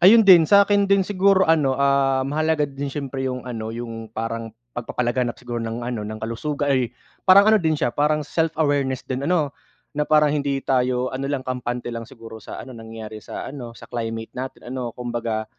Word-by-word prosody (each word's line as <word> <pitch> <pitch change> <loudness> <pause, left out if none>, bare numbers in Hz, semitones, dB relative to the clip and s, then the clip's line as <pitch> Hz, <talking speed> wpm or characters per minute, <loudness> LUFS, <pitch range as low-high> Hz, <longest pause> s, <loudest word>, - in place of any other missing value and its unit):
Ayun 215 +5 +8
din, 175 -5 +8
sa'kin 200 0 +5
din 200 -1 +4
siguro 195 0 +3
ano, 150 -5 +3
ah, 135 -1 +2
mahalaga 155 +2 +1
din 140 0 -5
siyempre 135 -1 -3
yung 125 -1 -5
ano, 115 -3 -5
yung 115 -1 -6
parang 115 +1 -4 0.2
pagpapalaganap 120 0 -1
siguro 120 -2 -5
ng 115 +1 -4
ano, 120 -2 -3
ng 105 +1 -5
kalusuga 140 +6 -2
ay 130 -3 +1 0.4
parang 200 +3 +8
ano 220 - +6
din 160 -2 +1
siya 120 -4 0
parang 150 0 +1
self-awareness 145 -5 0
din 130 +3 -3
ano, 155 -6 +1 0.4
na 150 0 -2
parang 150 -1 +4
hindi 140 -2 0
tayo 125 -1 +1
ano 135 +1 -3
lang 140 -2 -2
kampante 125 -1 -3
lang 115 -1 -6
siguro 115 -2 -11
sa - - -8
ano 130 - -10
nangyayari 110 -2 -9
sa - - -7
ano 120 -5 -8
sa - - -12
climate 115 -2 -5
natin 130 -1 -7
ano 130 -2 -3
kumbaga 120 -3 -3
130 Hz, 185 wpm, -23 LUFS, 120-150 Hz, 0.4 s, Ayun